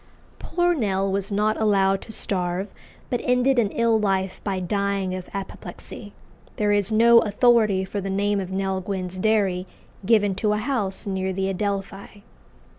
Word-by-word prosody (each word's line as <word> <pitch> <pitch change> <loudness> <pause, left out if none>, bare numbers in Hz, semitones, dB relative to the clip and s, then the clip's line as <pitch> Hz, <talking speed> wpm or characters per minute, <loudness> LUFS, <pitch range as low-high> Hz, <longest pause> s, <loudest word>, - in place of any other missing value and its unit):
Poor 350 0 +1
Nell 195 - 0
was 195 +1 -2
not 210 +2 0
"allowed 195 -2 +2
to - - -10
starve," 185 -1 -3 0.4
but 245 - 0
ended 250 +1 +2
an 215 -4 +2
ill 230 0 +2
life 195 -2 -1
by 195 -2 -2
dying 200 0 -1
of 185 -1 -6
apoplexy. 200 +1 -8 0.4
There 210 -1 +1
is 205 0 +2
no 230 +2 +6
authority 215 -3 +3
for 200 +1 -4
the 195 - -4
name 200 +1 0
of 185 -2 -4
"Nell 190 0 -2
Gwynn's 185 -1 -5
Dairy" 195 -3 +1 0.4
given 205 -1 +3
to 210 -1 +2
a - - 0
house 215 -4 -2
near 190 -1 -2
the 190 +1 -1
Adelphi. 200 +1 -4
200 Hz, 160 wpm, -23 LUFS, 190-215 Hz, 0.4 s, no